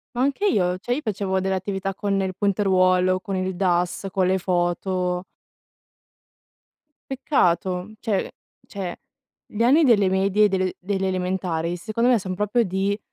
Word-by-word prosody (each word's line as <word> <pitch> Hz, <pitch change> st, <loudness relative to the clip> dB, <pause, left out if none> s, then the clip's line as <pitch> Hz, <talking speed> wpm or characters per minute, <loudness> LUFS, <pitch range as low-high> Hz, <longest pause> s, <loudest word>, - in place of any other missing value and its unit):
Ma 245 Hz, -, -2 dB
anche 280 Hz, +9 st, 0 dB
io, 180 Hz, -, +2 dB
cioè 240 Hz, +6 st, -4 dB
io -, -, -2 dB
facevo 195 Hz, -4 st, -1 dB
delle 190 Hz, 0 st, -1 dB
attività 195 Hz, 0 st, -3 dB
con 195 Hz, 0 st, -1 dB
il 190 Hz, -1 st, -2 dB
punteruolo, 185 Hz, -2 st, +2 dB
con 200 Hz, -4 st, -5 dB
il 185 Hz, 0 st, -2 dB
DAS, 180 Hz, +1 st, 0 dB
con 190 Hz, -2 st, +1 dB
le 190 Hz, +1 st, +2 dB
foto. 180 Hz, 0 st, -1 dB, 1.9 s
Peccato! 185 Hz, -, 0 dB
Cioè- 210 Hz, -5 st, -1 dB, 0.4 s
cioè, 185 Hz, -3 st, -5 dB, 0.5 s
gli 220 Hz, +2 st, -3 dB
anni 290 Hz, +7 st, +5 dB
delle 205 Hz, -7 st, +4 dB
medie 195 Hz, +2 st, +2 dB
e 210 Hz, -, +5 dB
delle 185 Hz, -1 st, 0 dB
delle 190 Hz, 0 st, -2 dB
elementari, 180 Hz, -2 st, -2 dB
secondo 225 Hz, +6 st, -1 dB
me, 245 Hz, -, +4 dB
son 185 Hz, -2 st, -4 dB
proprio 210 Hz, +5 st, +1 dB
di, 195 Hz, +2 st, -1 dB
190 Hz, 150 wpm, -23 LUFS, 185-205 Hz, 1.9 s, anni